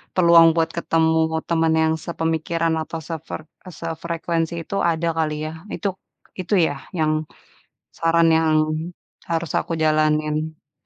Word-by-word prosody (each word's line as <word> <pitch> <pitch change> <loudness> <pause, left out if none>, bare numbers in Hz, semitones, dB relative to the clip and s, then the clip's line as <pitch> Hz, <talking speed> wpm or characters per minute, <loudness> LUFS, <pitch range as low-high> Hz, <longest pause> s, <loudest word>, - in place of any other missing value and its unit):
peluang 170 -2 +7
buat 165 0 +1
ketemu 160 -1 +2 0.3
teman 165 -1 +2
yang 160 0 +2
sepemikiran, 165 0 -1
atau 165 +1 -6
sefre 160 0 -6 0.2
eee, 180 - -9
sefrekuensi 165 0 -2
itu, 200 - -6 0.2
ada 165 +1 -1
kali 155 -1 0
ya. - - -5 0.2
Itu 200 - -3 0.5
itu 185 +3 0
ya, - - -3 0.2
yang, 155 0 +2 0.9
saran 165 0 +3
yang 160 -1 +2 0.8
harus 165 -1 -1
aku - - -5
jalanin. 155 0 +2 0.2
Mhm. 150 -2 -30
165 Hz, 135 wpm, -22 LUFS, 155-170 Hz, 0.9 s, peluang